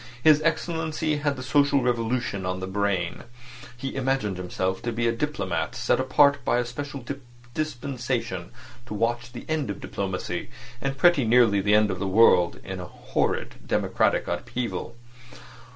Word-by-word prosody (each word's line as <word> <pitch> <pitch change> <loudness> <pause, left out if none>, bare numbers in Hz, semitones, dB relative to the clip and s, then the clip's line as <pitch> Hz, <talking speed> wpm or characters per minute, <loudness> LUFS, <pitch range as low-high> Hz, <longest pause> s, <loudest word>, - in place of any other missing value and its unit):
His 155 -1 +6
Excellency 160 -1 0
had 145 -1 0
the 130 - -7
social 140 0 +3
revolution 120 -4 0
on 90 0 -2
the 95 - -3
brain. 95 -2 -1 0.5
He 135 +2 -4
imagined 135 -8 0
himself 95 +1 -2
to 120 - -2
be 115 +1 0
a - - +3
diplomatist 150 +6 -2
set - - +3
apart 140 +2 +4
by - - +2
a 120 - +1
special 140 +1 -6 0.5
dispensation 125 - -3 0.4
to 105 - -5
watch 120 +2 -1
the 120 - -9
end 155 -7 -1
of 100 - -4
diplomacy, 95 -2 -4 0.3
and 135 0 -2
pretty 175 -3 +5
nearly 115 -3 +4
the 105 +2 +4
end 105 -1 +4
of 95 - -4
the 100 - -1
world, 95 -4 +5
in 95 -1 -6
a 90 - -5
horrid - - -2
democratic - - +1
upheaval. 120 -1 -3
120 Hz, 155 wpm, -26 LUFS, 100-140 Hz, 0.5 s, His